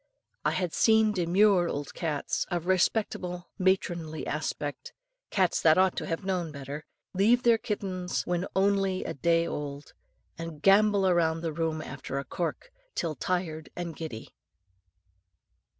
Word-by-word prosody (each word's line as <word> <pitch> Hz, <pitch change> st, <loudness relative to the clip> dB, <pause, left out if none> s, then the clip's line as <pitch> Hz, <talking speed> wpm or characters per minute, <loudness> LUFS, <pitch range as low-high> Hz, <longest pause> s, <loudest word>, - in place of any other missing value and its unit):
I -, -, +3 dB
have 180 Hz, -3 st, -1 dB
seen 220 Hz, -1 st, +4 dB
demure 185 Hz, 0 st, +3 dB
old 145 Hz, -1 st, -4 dB
cats, 155 Hz, -4 st, -2 dB
of 175 Hz, -2 st, -2 dB
respectable 180 Hz, -1 st, 0 dB
matronly 175 Hz, -4 st, 0 dB
aspect, 145 Hz, -1 st, -4 dB, 0.4 s
cats 185 Hz, -3 st, +2 dB
that 160 Hz, 0 st, +5 dB
ought 185 Hz, 0 st, +4 dB
to -, -, -3 dB
have 165 Hz, +3 st, -3 dB
known 180 Hz, -4 st, -1 dB
better, 140 Hz, +1 st, -7 dB, 0.3 s
leave 225 Hz, +6 st, +4 dB
their 235 Hz, -2 st, +5 dB
kittens 185 Hz, -4 st, -3 dB
when 175 Hz, +1 st, -1 dB
only 195 Hz, -1 st, +2 dB
a -, -, -4 dB
day 165 Hz, +4 st, +2 dB
old, 145 Hz, -2 st, -5 dB, 0.5 s
and 165 Hz, -2 st, -6 dB
gambol 200 Hz, -1 st, +5 dB
round 165 Hz, -1 st, +1 dB
the 165 Hz, -2 st, -2 dB
room 160 Hz, -1 st, -1 dB
after 135 Hz, 0 st, -6 dB
a 140 Hz, -, -3 dB
cork 175 Hz, -, -4 dB, 0.2 s
till 165 Hz, -3 st, -1 dB
tired 160 Hz, -2 st, -2 dB
and 175 Hz, -2 st, -5 dB
giddy. 125 Hz, -9 st, -7 dB
175 Hz, 140 wpm, -28 LUFS, 155-190 Hz, 0.5 s, that